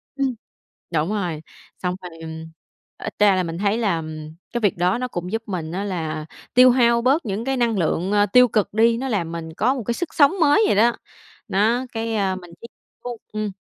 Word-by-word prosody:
Ừm, 270 -3 -1 0.6
đúng 160 0 0
rồi. 175 -7 -2 0.4
Xong 180 -1 -2
thì 165 -2 -9 0.7
ít - - -6
ra 205 -2 +5
là 185 - +1
mình 165 0 -5
thấy 200 +3 +1
là 195 -8 0 0.5
cái 240 - -1
việc 205 -4 +1
đó 180 +4 +2
nó 255 +1 -2
cũng 180 -6 -5
giúp 225 0 -2
mình 170 -5 -4
á 190 +3 -3
là 160 -6 -3 0.3
tiêu 255 +1 +8
hao 235 -1 +3
bớt 275 +6 +2
những 210 +2 -3
cái 270 0 0
năng 235 -3 +1
lượng, 180 +2 0
ờ, 205 0 +4
tiêu 250 +5 +6
cực 210 -3 0
đi. 230 +1 +4
Nó 265 +3 -3
làm 185 -9 -1
mình 160 -1 -6
có 245 +10 +1
một 255 - -4
cái 235 - -1
sức 350 +6 -4
sống 285 -1 +5
mới 310 +8 +5
vậy - - +2
đó. 230 +4 +5 0.6
Đó, 225 +6 +1
cái, 225 0 -3
ơ, 195 -3 0
mình 175 -2 -11
tiếp 235 - -9 0.4
thu 245 -1 -5 0.2
ừm. 215 -1 -2
210 Hz, 215 wpm, -22 LUFS, 180-240 Hz, 0.7 s, tiêu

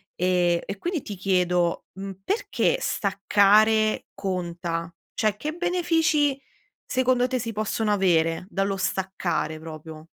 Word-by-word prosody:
Ehm, 175 -1 +2
e 195 - -5
quindi 340 - -2
ti 205 - -7
chiedo, 180 -2 +1
mhmm, 195 -1 -7
perché 470 +3 0
staccare 210 - +3
conta? 175 -3 -3 0.2
Cioè, 215 -2 +1
che 305 +6 -3
benefici 325 -5 +1 0.4
secondo 255 -1 +2
te 255 0 -1
si 230 0 -3
possono 215 0 -1
avere 170 -4 +2
dallo 195 -1 -1
staccare 175 -5 -2
proprio? 155 0 -9
195 Hz, 120 wpm, -25 LUFS, 175-240 Hz, 0.4 s, staccare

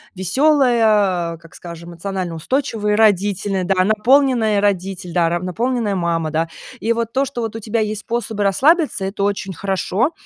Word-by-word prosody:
веселая, 210 - +2
как 165 0 -18
скажем, 170 -1 -10
эмоционально 180 0 -4
устойчивые 215 - -1
родители, 200 -2 +2
да, 185 0 +2
наполненная 225 0 +3
родитель, 190 -2 -1
да, 170 -1 +1
наполненная 220 +4 -1
мама, 170 -3 -1
да. 165 +1 -1 0.3
И 225 +4 0
вот 230 0 -3
то, 270 - +2
что 265 -3 -5
у 225 0 -4
тебя 225 +1 -2
есть 215 -1 -2
способы 225 -3 -3
расслабиться, 275 - +2
это 195 +1 -3
очень 200 -1 -1
хорошо. 195 - -1
205 Hz, 145 wpm, -19 LUFS, 180-230 Hz, 0.3 s, наполненная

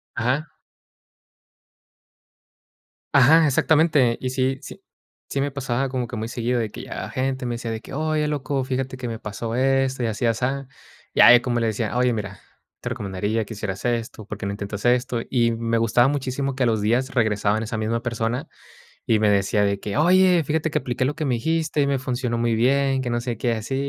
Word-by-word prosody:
Ajá. 130 +7 0 2.7
Ajá, 150 +4 +6
exactamente. 145 -3 +3
Y 130 - -3
sí 130 +1 0
sí - - -10 0.5
sí, 140 - -1
me 140 +1 -1
pasaba 135 -1 -2
como 125 -2 -2
que 120 - -7
muy 110 0 -3
seguido, 120 +1 -1
de 110 -2 -2
que - - -8
llegaba - - -6
gente, 130 0 -2
me 120 -1 -2
decía 115 -1 -5
de 110 - -3
que: - - -11
"Oye, 155 +1 0
loco, 140 -2 -2
fíjate 130 0 -3
que 125 -1 -5
me 115 -1 -5
pasó 115 +2 -5
esto 135 0 +1
y - - +1
así, 110 +2 -2
asá". 130 +4 -1 0.5
Y - - +4
ahí, 120 - +9
como 120 -1 -1
le 115 - +1
decía: 110 +1 -2
"Oye, 125 0 +3
mira, 100 -3 -5 0.4
te 125 - -4
recomendaría 105 -1 -2
que 105 - -8
hicieras 100 -2 -5
esto. 115 -3 -2
¿Por - - -7
qué - - -6
no 100 - -2
intentas 100 0 -6
esto?". 125 -1 +2
Y 120 -2 +2
me 115 0 -1
gustaba 115 +2 +3
muchísimo 135 -1 -2
que, 135 - 0
a - - +3
los 110 -3 +1
días 120 +5 +1
regresaba 105 -3 +1
esa 110 0 -4
misma 110 +2 -1
persona 120 +1 -2 0.6
y 110 - +3
me 105 -1 +3
decía 100 +1 +2
de 100 0 0
que: 105 - -4
"Oye, 180 +2 +5
fíjate 160 +2 -1
que 150 - +2
apliqué 125 -2 -2
lo 140 +3 0
que 155 - -4
me 130 -4 +1
dijiste, 160 +4 0
y 140 - +3
me 140 -1 +1
funcionó 125 -2 -2
muy 115 0 +1
bien. 135 +3 +2
Que 130 - -3
no 120 0 0
sé 120 -2 -4
qué, 120 0 0
así 110 +4 -3
125 Hz, 210 wpm, -23 LUFS, 115-135 Hz, 2.7 s, ahí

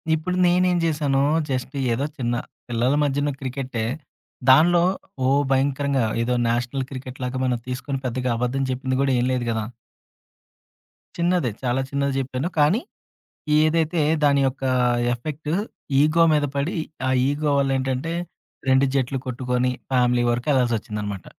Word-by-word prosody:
ఇప్పుడు 180 +4 -3
నేనేం 180 0 +3
చేశాను 145 -4 +1 0.3
జస్ట్ 130 +1 -3 0.2
ఏదో 135 +5 -1
చిన్న 120 -2 -1 0.3
పిల్లల 120 +3 +1
మధ్యన 145 +1 0
క్రికెటే. 130 -3 -3 0.7
దానిలో 170 +5 +6 0.4
ఓహ్! 140 +2 +3
భయంకరంగా 135 -1 +1 0.2
ఏదో 125 +1 0
నేషనల్ 125 +3 -1
క్రికెట్‌లాగా 130 -1 -5
మనం 125 -2 0
తీసుకొని 130 +2 -3
పెద్దగా 125 +1 -1
అబద్ధం 125 +3 -1
చెప్పింది 130 0 -2
కూడా 140 -1 +2
ఏం 120 - +1
లేదు 125 -1 -1
గదా! 110 -1 -2 1.5
చిన్నదే. 175 -7 +1
చాలా 125 +1 +1
చిన్నది 140 0 -1
చెప్పాను. 130 +5 -3
కానీ 180 - +4 0.8
ఏదైతే 160 +1 +1 0.2
దాని 140 -1 +4
యొక్క 135 +1 -4 0.5
ఎఫెక్ట్ 150 +5 -6 0.5
ఇగో 165 +2 +4
మీద 150 -1 +2
పడి 140 +5 -1 0.3
ఆ - - +2 0.2
ఇగో 145 +1 0
వల్ల 135 -1 +1
ఏంటంటే, 135 +5 -2 0.6
2 130 +1 +4
జట్లు 135 0 0
కొట్టుకొని 125 0 -1 0.2
ఫ్యామిలీ 125 -1 +3
వరకు 120 +2 -2
వెళ్లాల్సొచ్చిందన్నమాట. 110 - -1
135 Hz, 130 wpm, -23 LUFS, 125-145 Hz, 1.5 s, దానిలో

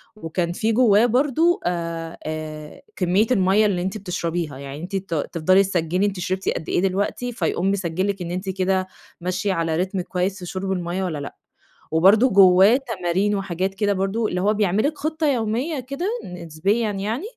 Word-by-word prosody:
وكان 170 -3 -2
في 220 +6 0
جواه 225 -2 +5
برضه 290 +8 +2
آآ، 170 -1 -3
آآ، 155 -1 -6
كمية 190 +4 +2
الميَّة 195 -1 +4
اللي 190 -4 +1
أنتِ 190 +3 -3
بتشربيها، 170 -6 -3
يعني 140 +2 -8
أنتِ 190 +3 -5
ت 190 -3 -3
تفضلي 170 +5 +2
تسجلّي 180 0 0
أنتِ 200 -2 -2
شربتِ 185 +1 -2
قد 160 - -3
إيه - - +1
دلوقتي، 200 +6 -1
فيقوم 185 -2 0
مسجل 185 -1 -1
لِك 200 -2 -2
إن 175 -1 -4
أنتِ 185 +2 -4
كده 190 0 0 0.3
ماشية 185 +3 -1
على 165 -2 -1
ريتم 185 +2 -1
كويس 185 +2 -2
في 180 - -7
شرب 190 +2 -4
الميَّة 180 0 -2
والَّا 175 -5 -2
لأ، 140 -1 -7 0.6
وبرضه 195 +10 +5
جواه 195 +3 +6
تمارين 195 -1 0
وحاجات 190 -1 -2
كده 205 0 +1
برضه، 195 +4 -1
اللي 180 -2 -2
هو 205 +3 +2
بيعمل 205 -1 +1
لِك 300 0 -4
خطة 315 +1 -1
يومية 255 +4 0
كده 275 +8 -4 0.2
نسبيًا 180 +6 -1
يعني، 210 - -3
190 Hz, 175 wpm, -22 LUFS, 175-210 Hz, 0.6 s, جواه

